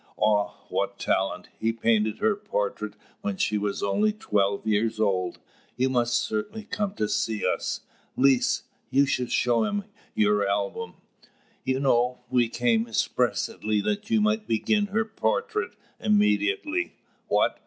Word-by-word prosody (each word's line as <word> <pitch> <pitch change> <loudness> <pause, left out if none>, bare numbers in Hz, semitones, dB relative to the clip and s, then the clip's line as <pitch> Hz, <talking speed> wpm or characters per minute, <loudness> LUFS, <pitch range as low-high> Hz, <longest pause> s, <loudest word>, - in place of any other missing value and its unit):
Ah, 105 -1 +2
what - - -1
talent! 95 +1 -1
He 115 +1 +1
painted 110 -1 +1
her 220 -1 +2
portrait 105 - -3 0.3
when 100 -2 -2
she 105 +2 +1
was 100 -1 -2
only 210 - +2
twelve 100 - 0
years 110 +1 +1
old. 95 -4 +1 0.4
You 130 +1 +2
must 120 -1 +2
certainly 110 - -3
come 205 -1 -3
to 105 - 0
see 110 0 -1
us. - - -1 0.4
Lise, 135 -1 +3 0.3
you 140 +1 +4
shall 125 -2 0
show 120 -2 +2
him 205 - -1 0.3
your 105 -1 +3
album. 100 0 -2 0.7
You 130 0 0
know, 125 -2 +2
we 120 -2 +3
came 115 -1 +1
expressly 110 -1 0
that 205 - -2
you 225 -1 +3
might 215 0 +1
begin 205 - +1
her 215 +2 0
portrait 450 - -1 0.2
immediately." 310 - +1 0.3
"What? - - +2
120 Hz, 140 wpm, -26 LUFS, -, 0.7 s, you